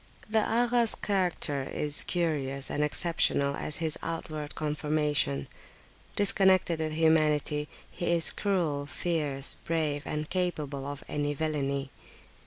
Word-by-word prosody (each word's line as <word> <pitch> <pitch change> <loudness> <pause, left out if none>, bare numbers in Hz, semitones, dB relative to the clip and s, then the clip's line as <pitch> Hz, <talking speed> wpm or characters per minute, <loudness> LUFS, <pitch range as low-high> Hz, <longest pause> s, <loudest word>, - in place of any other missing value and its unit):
The 220 +1 +2
Agha's 235 +1 +2
character 180 -8 0
is 145 +2 +1
curious 140 -6 0
and 150 - 0
exceptional 145 -2 +1
as 150 - -1
his 160 -2 0
outward 155 -2 -5
conformation. 150 - 0 0.7
Disconnected 190 -4 +4
with 155 -1 -2
humanity, 155 -2 +2 0.2
he 175 - -4
is 170 -1 +4
cruel, 165 -8 -1
fierce, 145 -5 -1
brave, 155 -3 -1
and 150 0 -3
capable 150 -7 -2
of 145 0 -6
any 145 0 -2
villany. 140 -3 -2
155 Hz, 115 wpm, -29 LUFS, 145-170 Hz, 0.7 s, Disconnected